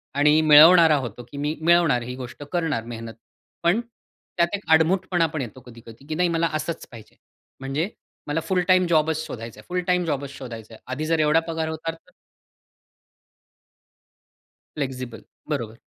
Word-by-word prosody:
आणि 150 Hz, +2 st, +4 dB
मिळवणारा 160 Hz, +1 st, +8 dB
होतो, 120 Hz, -2 st, -6 dB
की 140 Hz, -, -8 dB
मी 150 Hz, +2 st, -2 dB
मिळवणार 170 Hz, -6 st, +4 dB
ही 125 Hz, +1 st, -6 dB
गोष्ट 130 Hz, +2 st, -8 dB
करणार 165 Hz, -9 st, -1 dB
मेहनत. 115 Hz, 0 st, -7 dB, 0.5 s
पण 175 Hz, +6 st, +3 dB
त्यात 205 Hz, -6 st, -4 dB
एक 200 Hz, -, -9 dB
आडमुठपणा 175 Hz, +1 st, +2 dB
पण 155 Hz, -1 st, -4 dB
येतो 125 Hz, 0 st, -7 dB
कधी-कधी, 115 Hz, +1 st, -14 dB
की 155 Hz, -, -3 dB
नाही 180 Hz, +1 st, +2 dB
मला 165 Hz, 0 st, +1 dB
असच 155 Hz, +2 st, -3 dB
पाहिजे. 115 Hz, -3 st, -13 dB, 0.4 s
म्हणजे 140 Hz, +7 st, -2 dB, 0.4 s
मला 145 Hz, +2 st, 0 dB
फुल 185 Hz, -1 st, +1 dB
टाईम 185 Hz, -1 st, +5 dB
जॉबच 160 Hz, -1 st, +2 dB
शोधायच 115 Hz, -4 st, -8 dB
आहे, 105 Hz, -, -13 dB
फुल 180 Hz, 0 st, -1 dB
टाईम 180 Hz, -1 st, +2 dB
जॉबच 140 Hz, -3 st, -2 dB
शोधायच 120 Hz, -5 st, -9 dB
आहे. 110 Hz, -, -12 dB
आधी 150 Hz, +4 st, -3 dB
जर 165 Hz, 0 st, +1 dB
एवढा 155 Hz, +1 st, +4 dB
पगार 160 Hz, -1 st, -2 dB
होता 160 Hz, +1 st, -4 dB
तर 165 Hz, 0 st, -19 dB, 2.7 s
फ्लेक्सिबल, 130 Hz, -4 st, -5 dB, 0.3 s
बरोबर. 115 Hz, -6 st, -3 dB
155 Hz, 160 wpm, -23 LUFS, 130-170 Hz, 2.7 s, मिळवणारा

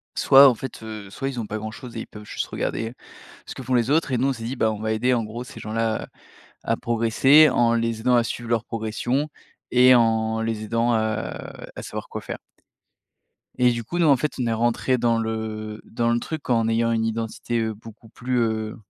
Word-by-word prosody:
soit 135 Hz, +1 st, +8 dB
en 130 Hz, -, +5 dB
fait, 125 Hz, 0 st, -8 dB
heu, 110 Hz, -3 st, -8 dB
soit 135 Hz, +7 st, -4 dB
ils 125 Hz, -3 st, -5 dB
ont 110 Hz, -, -4 dB
pas 110 Hz, -, -4 dB
grand-chose 110 Hz, +3 st, -8 dB
et 110 Hz, -, -3 dB
ils -, -, -8 dB
peuvent 105 Hz, 0 st, -11 dB
juste -, -, -3 dB
regarder 115 Hz, +1 st, -3 dB, 0.5 s
ce -, -, -8 dB
que 130 Hz, -, -8 dB
font 130 Hz, +1 st, -1 dB
les 120 Hz, +2 st, +2 dB
autres. 160 Hz, -1 st, +2 dB
Et 130 Hz, -, +1 dB
nous, 130 Hz, +3 st, +1 dB
on -, -, +2 dB
s'est 115 Hz, -3 st, -7 dB
dit 125 Hz, +3 st, -4 dB
bah, 110 Hz, -2 st, +2 dB
on 105 Hz, -, -6 dB
va 110 Hz, 0 st, -1 dB
aider, 125 Hz, +4 st, +1 dB
en 120 Hz, -, +2 dB
gros, 115 Hz, +3 st, -6 dB
ces 125 Hz, -, -11 dB
gens-là 110 Hz, +1 st, -1 dB
à -, -, -13 dB, 0.7 s
à -, -, -1 dB
progresser. 125 Hz, +6 st, +5 dB
En 120 Hz, -2 st, +3 dB
les 115 Hz, -1 st, -1 dB
aidant 125 Hz, +1 st, +3 dB
à 120 Hz, -, +4 dB
suivre 115 Hz, +1 st, -5 dB
leur 115 Hz, -1 st, +1 dB
progression 120 Hz, +6 st, -2 dB, 0.4 s
et 125 Hz, 0 st, +7 dB
en 110 Hz, -1 st, +2 dB
les 115 Hz, -1 st, -2 dB
aidant, 115 Hz, +2 st, +1 dB
heu, -, -, +2 dB, 0.8 s
à -, -, -6 dB
savoir -, -, -6 dB
quoi -, -, -5 dB
faire. -, -, -6 dB, 1.2 s
Et 125 Hz, 0 st, +5 dB
du 115 Hz, -1 st, -3 dB
coup, 175 Hz, +10 st, -4 dB
nous 170 Hz, -, +4 dB
en 140 Hz, -3 st, +6 dB
fait, 150 Hz, +4 st, -1 dB
on 120 Hz, -, 0 dB
est 115 Hz, -, +1 dB
rentrés 120 Hz, +3 st, +1 dB
dans 115 Hz, -1 st, +2 dB
le, 110 Hz, 0 st, -1 dB, 0.5 s
heu, -, -, -15 dB
dans 115 Hz, +1 st, -1 dB
le 120 Hz, -, +2 dB
truc 155 Hz, +3 st, -6 dB
en 115 Hz, -2 st, +2 dB
ayant 115 Hz, +1 st, +1 dB
une 115 Hz, -1 st, +1 dB
identité, 115 Hz, +1 st, -2 dB
heu, 110 Hz, -1 st, -1 dB
beaucoup 115 Hz, +1 st, -14 dB
plus, 125 Hz, +1 st, -2 dB
heu, 110 Hz, -2 st, -1 dB
115 Hz, 235 wpm, -23 LUFS, 110-125 Hz, 1.2 s, soit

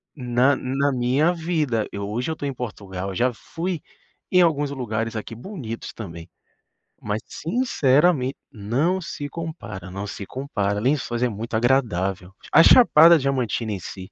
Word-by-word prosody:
na 125 Hz, 0 st, +2 dB
na 135 Hz, +2 st, 0 dB
minha 130 Hz, +6 st, +2 dB
vida. 155 Hz, -10 st, -1 dB
Eu 100 Hz, 0 st, -4 dB
hoje 120 Hz, +8 st, -2 dB
eu -, -, -3 dB
tô 145 Hz, -, -6 dB
em 140 Hz, -, -2 dB
Portugal, 100 Hz, -6 st, -6 dB
eu 95 Hz, -, -6 dB
já 125 Hz, +5 st, +2 dB
fui 170 Hz, +7 st, -4 dB, 0.5 s
em 180 Hz, -, +6 dB
alguns 145 Hz, -4 st, +2 dB
lugares 115 Hz, -4 st, -3 dB
aqui 110 Hz, +1 st, -5 dB
bonitos 120 Hz, -, -7 dB
também. 85 Hz, -6 st, -8 dB, 0.7 s
Mas 105 Hz, +1 st, -2 dB
sinceramente 150 Hz, -, +1 dB, 0.2 s
não 135 Hz, -, 0 dB
se 145 Hz, -4 st, -6 dB
compara, 150 Hz, -, -7 dB
não 100 Hz, +2 st, -5 dB
se 100 Hz, 0 st, -6 dB
compara, 105 Hz, -5 st, -2 dB
Lençóis 125 Hz, -2 st, 0 dB
é 125 Hz, -, +2 dB
muito 110 Hz, +2 st, -6 dB
agradável. 100 Hz, -7 st, 0 dB, 0.2 s
A 165 Hz, -, +8 dB
Chapada 170 Hz, -6 st, +8 dB
Diamantina 130 Hz, -5 st, -1 dB
em 100 Hz, -, -3 dB
si, 95 Hz, +2 st, -9 dB
125 Hz, 155 wpm, -23 LUFS, 105-150 Hz, 0.7 s, A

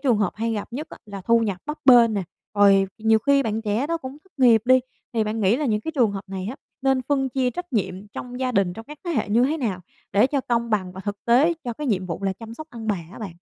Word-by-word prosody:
trường 260 Hz, -5 st, +3 dB
hợp 205 Hz, -4 st, +1 dB
hay 230 Hz, +1 st, -2 dB
gặp 210 Hz, -2 st, -4 dB
nhất 300 Hz, +6 st, -4 dB
á, -, -, -10 dB
là 200 Hz, -2 st, -7 dB
thu 230 Hz, +5 st, +3 dB
nhập 205 Hz, -5 st, -1 dB
bấp 300 Hz, +1 st, -4 dB
bênh 240 Hz, -4 st, +7 dB
nè, 200 Hz, -, 0 dB, 0.3 s
rồi 195 Hz, -1 st, +5 dB
nhiều 220 Hz, 0 st, +4 dB
khi 280 Hz, +4 st, +3 dB
bạn 220 Hz, -2 st, -2 dB
trẻ 215 Hz, +6 st, 0 dB
đó 335 Hz, +1 st, 0 dB
cũng 265 Hz, -3 st, -8 dB
thất 380 Hz, -, -27 dB
nghiệp 235 Hz, -4 st, +6 dB
đi, 255 Hz, +1 st, +5 dB, 0.3 s
thì 225 Hz, -2 st, +1 dB
bạn 215 Hz, +1 st, -2 dB
nghĩ 200 Hz, +3 st, +3 dB
là 300 Hz, -, -2 dB
những 210 Hz, -3 st, +1 dB
trường 240 Hz, -7 st, +3 dB
hợp 195 Hz, 0 st, -6 dB
này 190 Hz, 0 st, -5 dB
á 265 Hz, -, -8 dB, 0.3 s
nên 265 Hz, -1 st, +2 dB
phân 270 Hz, +1 st, 0 dB
chia 255 Hz, 0 st, 0 dB
trách 355 Hz, 0 st, -7 dB
nhiệm 200 Hz, -2 st, -2 dB
trong 250 Hz, +4 st, -7 dB
gia 255 Hz, -1 st, 0 dB
đình 195 Hz, -5 st, +2 dB
trong 225 Hz, +4 st, -9 dB
các 300 Hz, +1 st, -11 dB
thế 345 Hz, -, -2 dB
hệ 240 Hz, -11 st, 0 dB
như 230 Hz, +4 st, +4 dB
thế 295 Hz, +5 st, +1 dB
nào 215 Hz, -, -2 dB, 0.3 s
để 210 Hz, +5 st, +5 dB
cho 275 Hz, +1 st, 0 dB
công 235 Hz, -2 st, -1 dB
bằng 185 Hz, -4 st, 0 dB
và 190 Hz, -, -8 dB
thực 205 Hz, 0 st, -6 dB
tế 260 Hz, +8 st, +4 dB
cho 240 Hz, -, -2 dB
cái 295 Hz, +5 st, -5 dB
nhiệm 190 Hz, -6 st, 0 dB
vụ 175 Hz, +2 st, -5 dB
là 195 Hz, -, +1 dB
chăm 225 Hz, +3 st, -10 dB
sóc 310 Hz, +5 st, -8 dB
ông 225 Hz, -2 st, -8 dB
bà 205 Hz, -3 st, +1 dB, 0.2 s
á -, -, -10 dB
bạn? 210 Hz, -6 st, -6 dB
230 Hz, 285 wpm, -23 LUFS, 205-260 Hz, 0.3 s, bênh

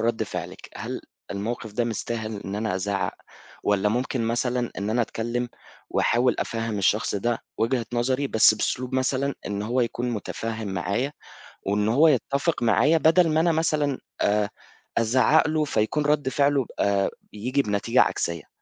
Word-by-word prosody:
رد 115 Hz, 0 st, 0 dB
فعلِك، -, -, -6 dB
"هل -, -, -5 dB, 0.3 s
الموقف 110 Hz, +2 st, -4 dB
ده 120 Hz, +2 st, 0 dB
مستاهل 110 Hz, -1 st, -3 dB
إن 95 Hz, +1 st, -4 dB
أنا 105 Hz, -2 st, -1 dB
أزعَّق؟ 100 Hz, +1 st, -1 dB, 0.5 s
والّا 105 Hz, 0 st, +2 dB
ممكن 125 Hz, +2 st, -1 dB
مثلًا 120 Hz, +1 st, 0 dB
إن 100 Hz, +2 st, -2 dB
أنا 120 Hz, +2 st, +2 dB
أتكلّم 120 Hz, +2 st, -2 dB, 0.4 s
وأحاول 125 Hz, +2 st, +2 dB
أفهّم 115 Hz, -2 st, -2 dB
الشخص 105 Hz, +3 st, +1 dB
ده 115 Hz, +3 st, 0 dB, 0.2 s
وجهة 115 Hz, -1 st, +1 dB
نظري 130 Hz, +3 st, +1 dB
بس 110 Hz, -3 st, +5 dB
بأسلوب 125 Hz, +4 st, -2 dB
مثلًا 130 Hz, +1 st, 0 dB
إن 100 Hz, 0 st, -2 dB
هو 120 Hz, +4 st, 0 dB
يكون 120 Hz, +1 st, -1 dB
متفهم 110 Hz, 0 st, -4 dB
معايا، 100 Hz, +9 st, -1 dB, 0.5 s
وإن 105 Hz, +2 st, +1 dB
هو 140 Hz, +9 st, +5 dB
يتفق 140 Hz, +1 st, +1 dB
معايا 145 Hz, +8 st, +4 dB
بدل 165 Hz, +2 st, +4 dB
ما 155 Hz, -, +2 dB
أنا 170 Hz, +1 st, +3 dB
مثلًا 155 Hz, -4 st, +1 dB, 0.2 s
آآ 105 Hz, 0 st, +2 dB, 0.5 s
أزعَّق 130 Hz, +7 st, +4 dB
له 155 Hz, 0 st, +1 dB
فيكون 145 Hz, +3 st, 0 dB
رد 145 Hz, -3 st, +2 dB
فعله 140 Hz, 0 st, +2 dB
آآ 100 Hz, -1 st, +2 dB, 0.2 s
ييجي 125 Hz, +7 st, 0 dB
بنتيجة 105 Hz, -4 st, +2 dB
عكسية." 85 Hz, -3 st, -1 dB
120 Hz, 150 wpm, -25 LUFS, 105-135 Hz, 0.5 s, بس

